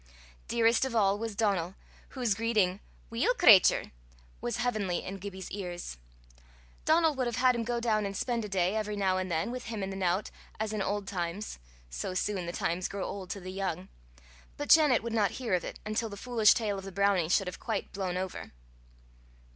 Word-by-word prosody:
Dearest 230 Hz, 0 st, +3 dB
of 265 Hz, -3 st, -2 dB
all 200 Hz, -2 st, +3 dB
was 225 Hz, -2 st, -4 dB
Donal, 195 Hz, -4 st, 0 dB, 0.4 s
whose 240 Hz, -5 st, +2 dB
greeting 205 Hz, -4 st, +1 dB, 0.3 s
"Weel, 270 Hz, -, +2 dB
cratur," 220 Hz, -, +6 dB, 0.5 s
was 240 Hz, -1 st, -2 dB
heavenly 215 Hz, -7 st, -1 dB
in 195 Hz, +1 st, -6 dB
Gibbie's 190 Hz, -1 st, -7 dB
ears. 175 Hz, -, -5 dB, 0.9 s
Donal 320 Hz, 0 st, +4 dB
would 260 Hz, -3 st, -1 dB
have 240 Hz, -, -2 dB
had 255 Hz, 0 st, +4 dB
him 235 Hz, -1 st, -2 dB
go 240 Hz, +1 st, -1 dB
down 215 Hz, -3 st, +1 dB
and 195 Hz, -1 st, -5 dB
spend 235 Hz, -3 st, -1 dB
a 210 Hz, -, -5 dB
day, 185 Hz, 0 st, +1 dB
every 210 Hz, -1 st, -2 dB
now 190 Hz, -2 st, +1 dB
and 185 Hz, 0 st, -3 dB
then, 165 Hz, +8 st, 0 dB
with 250 Hz, 0 st, -6 dB
him 225 Hz, -3 st, -4 dB
and 190 Hz, -, -3 dB
the -, -, -6 dB
nowt, 185 Hz, +1 st, 0 dB, 0.3 s
as 220 Hz, 0 st, -2 dB
in 210 Hz, -, -1 dB
old 200 Hz, 0 st, -2 dB
times 180 Hz, -, -4 dB, 0.3 s
so -, -, -4 dB
soon 185 Hz, -2 st, -1 dB
the -, -, -2 dB
times 175 Hz, +1 st, -1 dB
grow 200 Hz, -1 st, -4 dB
old 190 Hz, -2 st, -6 dB
to 200 Hz, -, -4 dB
the 185 Hz, 0 st, -7 dB
young! 190 Hz, -1 st, -3 dB, 0.7 s
but 290 Hz, -, -5 dB
Janet 295 Hz, -8 st, +6 dB
would 230 Hz, -1 st, -4 dB
not 210 Hz, -3 st, +2 dB
hear 240 Hz, -6 st, -2 dB
of 180 Hz, -, +2 dB
it, -, -, -6 dB
until 215 Hz, +1 st, -1 dB
the 200 Hz, -, -8 dB
foolish 225 Hz, -1 st, +4 dB
tale 210 Hz, -4 st, -1 dB
of -, -, -9 dB
the 195 Hz, -, -6 dB
brownie 200 Hz, -4 st, +2 dB
should 195 Hz, +2 st, +3 dB
have 180 Hz, -, -6 dB
quite -, -, -3 dB
blown 185 Hz, -2 st, -2 dB
over. 185 Hz, -1 st, -5 dB
205 Hz, 200 wpm, -30 LUFS, 185-230 Hz, 0.9 s, cratur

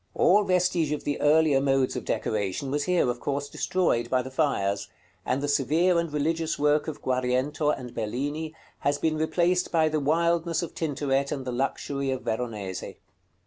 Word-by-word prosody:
All 205 Hz, +4 st, +5 dB
vestige 180 Hz, -5 st, +1 dB
of 150 Hz, -, -4 dB
the 145 Hz, -, -2 dB
earlier 150 Hz, -2 st, +4 dB
modes 135 Hz, -1 st, +1 dB
of -, -, -4 dB
decoration 105 Hz, +5 st, -2 dB
was 145 Hz, 0 st, 0 dB
here, 180 Hz, -6 st, +2 dB
of 120 Hz, 0 st, -2 dB
course, 140 Hz, +1 st, -2 dB
destroyed 130 Hz, -10 st, 0 dB
by 130 Hz, -1 st, +1 dB
the 130 Hz, -, -8 dB
fires; 100 Hz, -9 st, 0 dB, 0.4 s
and 135 Hz, +3 st, 0 dB
the -, -, 0 dB
severe 160 Hz, +6 st, +2 dB
and 170 Hz, -2 st, -2 dB
religious 160 Hz, +2 st, -1 dB
work 150 Hz, +1 st, +2 dB
of 155 Hz, -, -6 dB
Guariento 130 Hz, +4 st, 0 dB
and 125 Hz, -5 st, -3 dB
Bellini 145 Hz, +8 st, -3 dB, 0.2 s
has 145 Hz, +1 st, +1 dB
been 155 Hz, +1 st, 0 dB
replaced 175 Hz, +3 st, +1 dB
by 160 Hz, -2 st, +3 dB
the 155 Hz, 0 st, 0 dB
wildness 170 Hz, +3 st, +1 dB
of 170 Hz, -, -6 dB
Tintoret 140 Hz, -3 st, -1 dB
and 135 Hz, -3 st, -3 dB
the 125 Hz, -, -3 dB
luxury 135 Hz, +2 st, -2 dB
of 130 Hz, -1 st, -2 dB
Veronese. 110 Hz, -5 st, -3 dB
145 Hz, 175 wpm, -26 LUFS, 130-160 Hz, 0.4 s, All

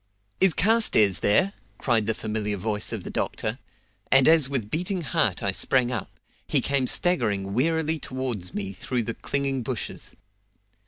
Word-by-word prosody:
"Is 190 Hz, -4 st, +5 dB
Carstairs 190 Hz, -, +4 dB
there?" 180 Hz, -, +2 dB, 0.2 s
cried 115 Hz, -5 st, 0 dB
the 110 Hz, -, 0 dB
familiar 105 Hz, -2 st, -3 dB
voice 105 Hz, +2 st, -2 dB
of -, -, -5 dB
the -, -, -7 dB
doctor, -, -, -3 dB, 0.5 s
and 135 Hz, -1 st, +6 dB
as 160 Hz, -4 st, +5 dB
with 120 Hz, -7 st, -3 dB
beating 180 Hz, +2 st, -2 dB
heart 150 Hz, -, 0 dB
I 100 Hz, -, +1 dB
sprang 125 Hz, +5 st, +1 dB
up, 120 Hz, -, -4 dB, 0.4 s
he -, -, +4 dB
came 140 Hz, -2 st, 0 dB
staggering 105 Hz, -, 0 dB
wearily 160 Hz, +5 st, 0 dB
towards 125 Hz, -10 st, -3 dB
me 100 Hz, -1 st, -4 dB
through 120 Hz, +5 st, -2 dB
the 115 Hz, -, -4 dB
clinging 140 Hz, 0 st, -2 dB
bushes. 120 Hz, -1 st, -5 dB
125 Hz, 155 wpm, -25 LUFS, 105-155 Hz, 0.5 s, and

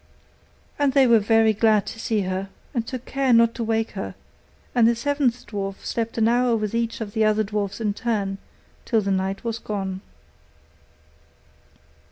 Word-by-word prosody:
And 285 Hz, -2 st, +2 dB
they 275 Hz, -1 st, +6 dB
were 235 Hz, -2 st, +6 dB
very 225 Hz, +1 st, +3 dB
glad 215 Hz, -1 st, +3 dB
to 225 Hz, -, -7 dB
see 220 Hz, -2 st, 0 dB
her, 190 Hz, +1 st, -3 dB, 0.2 s
and 235 Hz, -3 st, -2 dB
took 255 Hz, -1 st, -6 dB
care 270 Hz, -1 st, 0 dB
not 230 Hz, -1 st, +5 dB
to 235 Hz, -, -4 dB
wake 225 Hz, 0 st, 0 dB
her; -, -, -6 dB, 0.6 s
and 235 Hz, -2 st, +5 dB
the 235 Hz, -, +3 dB
seventh 255 Hz, -1 st, 0 dB
dwarf 195 Hz, -2 st, -5 dB
slept 230 Hz, 0 st, -3 dB
an 225 Hz, -1 st, +3 dB
hour 240 Hz, 0 st, +3 dB
with 215 Hz, -1 st, -2 dB
each 230 Hz, 0 st, -1 dB
of 205 Hz, -2 st, -5 dB
the 220 Hz, -, +2 dB
other 215 Hz, 0 st, +3 dB
dwarfs 205 Hz, 0 st, -3 dB
in 210 Hz, -2 st, 0 dB
turn, 200 Hz, -4 st, -2 dB, 0.4 s
till 225 Hz, -3 st, +1 dB
the 200 Hz, -1 st, -1 dB
night 190 Hz, +1 st, -1 dB
was 230 Hz, -1 st, -3 dB
gone. 195 Hz, -2 st, -4 dB
225 Hz, 175 wpm, -23 LUFS, 205-235 Hz, 0.6 s, they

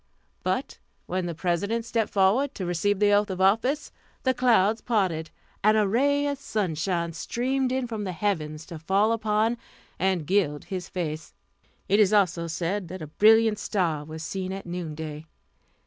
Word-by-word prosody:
But -, -, -2 dB, 0.3 s
when 185 Hz, 0 st, -2 dB
the 170 Hz, -, -4 dB
President 200 Hz, +7 st, -1 dB
stepped 230 Hz, -2 st, -1 dB
forward 215 Hz, +9 st, +2 dB
to 185 Hz, -, -4 dB
receive 175 Hz, +4 st, 0 dB
the 205 Hz, +1 st, +3 dB
oath 205 Hz, +1 st, +3 dB
of 190 Hz, -1 st, -4 dB
office, 225 Hz, +10 st, +2 dB, 0.3 s
the 260 Hz, -, +3 dB
clouds 225 Hz, -4 st, +3 dB
parted, 185 Hz, -9 st, 0 dB, 0.3 s
and 215 Hz, +1 st, +5 dB
a 210 Hz, -2 st, +3 dB
ray 285 Hz, +7 st, +2 dB
of 285 Hz, -1 st, -2 dB
sunshine 170 Hz, -, -1 dB
streamed 260 Hz, +4 st, -1 dB
from 220 Hz, -3 st, -4 dB
the 190 Hz, -, -3 dB
heavens 160 Hz, -5 st, -2 dB
to 165 Hz, -, -8 dB
fall 195 Hz, +7 st, +2 dB
upon 220 Hz, +1 st, +1 dB, 0.4 s
and 185 Hz, -4 st, +1 dB
gild 160 Hz, -5 st, +1 dB
his 185 Hz, -3 st, -5 dB
face. 155 Hz, -3 st, -4 dB, 0.5 s
It 200 Hz, +2 st, +3 dB
is 210 Hz, -1 st, +4 dB
also 175 Hz, -5 st, +2 dB
said 175 Hz, +4 st, -2 dB
that 180 Hz, 0 st, -7 dB
a 155 Hz, 0 st, -10 dB
brilliant 220 Hz, 0 st, +6 dB
star 170 Hz, -9 st, -1 dB
was 160 Hz, +1 st, -8 dB
seen 185 Hz, +3 st, -4 dB
at 195 Hz, 0 st, -6 dB
noon 170 Hz, -3 st, -5 dB
day. 155 Hz, 0 st, -6 dB
195 Hz, 165 wpm, -26 LUFS, 170-220 Hz, 0.5 s, brilliant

